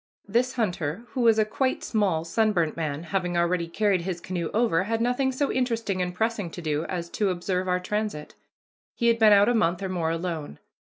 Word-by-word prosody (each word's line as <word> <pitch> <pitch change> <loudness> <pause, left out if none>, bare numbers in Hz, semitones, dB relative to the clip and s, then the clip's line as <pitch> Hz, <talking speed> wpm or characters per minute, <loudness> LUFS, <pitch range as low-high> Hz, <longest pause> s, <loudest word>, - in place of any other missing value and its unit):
This 245 +5 +1
hunter, 180 - -2
who 245 +3 -3
was 225 -2 +5
a 215 - +4
quite 260 +5 -1
small, 190 -7 0
sunburnt 180 -4 +1
man, 155 -2 -3
having 175 +1 -1
already 170 0 +1
carried 195 +1 +1
his 175 0 -4
canoe 175 -2 -3
over, 210 -6 +2
had 225 +2 -1
nothing 250 +3 +1
so 275 +2 -1
interesting 230 -7 -1
and 180 0 -1
pressing 210 0 -1
to 170 - -9
do 155 -2 -1
as 175 -2 -4
to 205 -2 0
observe 185 +1 -2
our 180 0 +1
transit. 205 -5 -3 0.6
He 235 -1 +2
had 230 0 +2
been 220 -2 +6
out 205 0 +6
a 245 - +3
month 180 -5 +1
or 190 - -2
more 170 -3 -1
alone. 165 - -4
185 Hz, 205 wpm, -26 LUFS, 170-225 Hz, 0.6 s, been